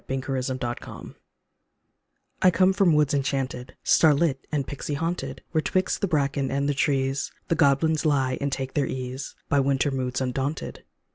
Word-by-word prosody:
53 135 0 -2
DREAM 130 0 -3
SONG 120 -1 -6 1.3
I 185 - +7
COME 185 +2 +3
from 190 -5 +4
woods 150 -2 +3
enchaunted, 135 -2 -2
Starlit 150 -3 +3
and 145 -3 0
pixey 145 +1 -4
haunted, 165 +4 -3
Where 160 - +2
'twixt 185 +3 0
the 200 - +1
bracken 140 -4 0
and 140 +1 0
the 145 - +1
trees 135 -1 0 0.2
The 165 - +2
goblins 155 +1 +3
lie 135 -4 +1
and 140 0 -1
take 135 -1 -3
their 140 -3 +1
ease 130 +1 -5
By 145 - +2
winter 135 +1 +1
moods 130 -1 -2
undaunted. 135 +3 -3
140 Hz, 160 wpm, -25 LUFS, 130-155 Hz, 1.3 s, I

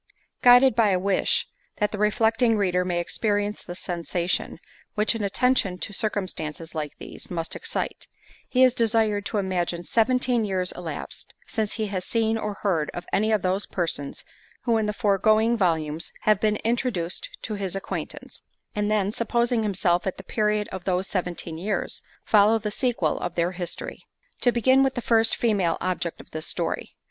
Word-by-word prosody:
Guided 245 0 +7
by 225 -3 +4
a 190 - +3
wish, 200 - +1 0.3
that 210 -1 0
the 210 - -4
reflecting 225 +2 +3
reader 180 -3 +2
may 175 -1 -1
experience 205 +3 -1
the 175 - -8
sensation, 175 0 -2 0.4
which 210 +2 +3
an 225 -2 -3
attention 200 -2 +1
to 205 - -5
circumstances 180 -7 -3
like 150 -3 -4
these, - - -9
must 165 -2 -3
excite; - - -3 0.4
he 255 0 +4
is 255 -2 +6
desired 220 -3 +1
to 215 - -2
imagine 180 -3 -1
seventeen 245 +3 +2
years 185 -3 -1
elapsed, 165 -4 -7
since 215 -2 -2
he 220 - -2
has 195 -3 -3
seen 225 +1 +1
or 210 -2 -3
heard 165 -7 +1
of 175 - -5
any 215 +2 +2
of 215 -3 +2
those 190 +2 +1
persons 160 -6 -3 0.4
who 235 -2 +2
in 220 -1 +1
the - - +1
foregoing 215 +3 +3
volumes 165 -5 0
have 215 -2 +3
been 215 -1 +2
introduced 225 -7 -1
to 220 - -3
his 195 -3 -3
acquaintance—and 205 +1 -5
then, 205 -2 +1
supposing 235 +1 +1
himself 185 -4 +2
at 190 - -2
the - - -9
period 210 -1 0
of 190 -2 -6
those 185 0 +1
seventeen 175 -4 -3
years, 200 +3 -2 0.2
follow 215 +1 +5
the 215 -1 -3
sequel 245 +2 0
of 175 -1 -4
their 170 +1 +1
history. 175 -1 -5 0.4
To 245 - +3
begin 260 +3 +4
with 270 -1 +2
the 245 - -2
first 225 -1 +3
female 200 -8 +1
object 175 -2 -2
of - - -14
this 155 0 -4
story. - - -2
205 Hz, 170 wpm, -25 LUFS, 180-225 Hz, 0.4 s, Guided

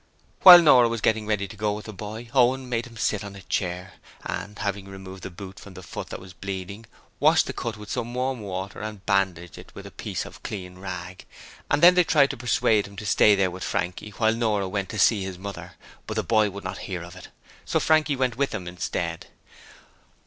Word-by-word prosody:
While 175 -2 +11
Nora 125 -6 +6
was 115 0 -2
getting 110 0 +1
ready 105 -2 0
to 100 - -11
go 105 0 -1
with 105 +1 -7
the 110 - -8
boy, 110 +4 -8
Owen 130 0 +3
made 120 0 -2
him 115 -2 -14
sit 105 -1 0
on 100 -1 -8
a 100 - -11
chair, 90 +1 -3 0.3
and 105 +1 -5
having 100 -2 -3
removed 95 -1 -10
the - - -6
boot 95 +2 -10
from 100 -2 -13
the 95 - -10
foot - - -7
that - - -6
was 95 -1 -12
bleeding, 100 +3 -7 0.3
washed - - +5
the - - -5
cut 115 -2 -4
with 105 -1 -9
some 120 -1 -3
warm 130 0 -1
water 95 -1 -5
and 105 -3 -7
bandaged 95 -4 0
it - - -13
with - - -9
a - - -9
piece - - -5
of - - -12
clean 90 -3 -7
rag, 90 -1 -7 0.4
and 145 +3 +1
then 175 +1 +10
they 180 0 +5
tried 145 -4 +3
to - - -6
persuade 110 -3 +2
him 100 - -14
to 105 - -7
stay 105 0 +5
there 95 -2 +1
with 90 +1 -7
Frankie 90 +4 -3
while 110 -1 +3
Nora 110 -4 0
went 95 0 -3
to 110 - -5
see 105 +1 +4
his 95 -1 -6
mother, 100 +1 -8 0.3
but - - -4
the - - 0
boy 110 -2 +3
would 100 +1 -9
not - - -5
hear 90 -3 -4
of 85 0 -11
it. - - -11 0.4
So - - 0
Frankie 155 -2 +3
went 130 -3 -1
with 140 0 +1
them 95 -5 -6
instead. 90 0 -4
105 Hz, 230 wpm, -25 LUFS, 95-115 Hz, 0.4 s, While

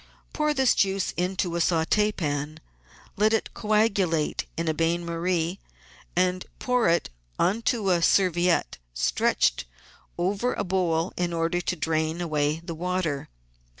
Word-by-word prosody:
Pour 300 -1 +1
this 265 -2 +4
juice 195 -1 +1
into 180 0 -1
a - - 0
saut^pan, 160 -4 0 0.6
let 215 +2 +3
it 225 - 0
coagu 210 -4 +2
late 160 -2 -1
in 165 0 -2
a 160 - +2
bain 165 +2 0
marie, 170 +1 -1 0.6
and 180 0 +1
pour 250 -6 +1
it 170 - +1 0.3
on 205 +6 +1
to 220 -5 +1
a 175 -1 +2
serviette 175 - +2 0.2
stretched - - +1 0.5
over 200 +8 0
a - - -2
bowl 175 -3 0
in 175 -1 0
order 165 +1 0
to 180 - -2
drain 160 0 -1
away 155 -2 0
the 170 - -4
water. 170 -4 -2
175 Hz, 140 wpm, -26 LUFS, 165-195 Hz, 0.6 s, this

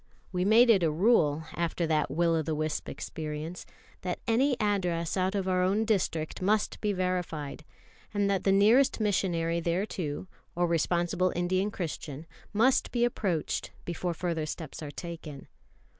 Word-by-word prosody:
We 180 -1 0
made 230 +4 +7
it 200 -4 +4
a 165 - +3
rule, 160 -3 +3
after 170 0 -1
that 155 -2 +1
will 165 +4 +2
of 160 -2 -1
the 160 - 0
wisp 155 0 -2
experience, 155 +2 -6 0.3
that 180 -1 -2
any 255 +3 +2
address 180 -6 0
out 190 +1 0
of 195 -2 -1
our 185 -1 +2
own 200 +4 +2
district 175 -8 -1
must 210 +3 +1
be 210 - +1
verified; 180 -6 -2 0.5
and 205 -1 +1
that 195 -1 +1
the 195 - +3
nearest 220 +8 +5
missionary 175 -5 +1
thereto, 170 -2 -2 0.3
or 175 +1 +2
responsible 175 +2 +1
Indian 185 +3 +1
Christian, 160 -5 -5 0.3
must 235 +5 +3
be 240 -1 +2
approached, 190 -9 -1 0.2
before 175 0 -2
further 165 -3 -2
steps 155 0 -6
are 150 - -5
taken. 155 -3 -8
180 Hz, 155 wpm, -29 LUFS, 160-200 Hz, 0.5 s, made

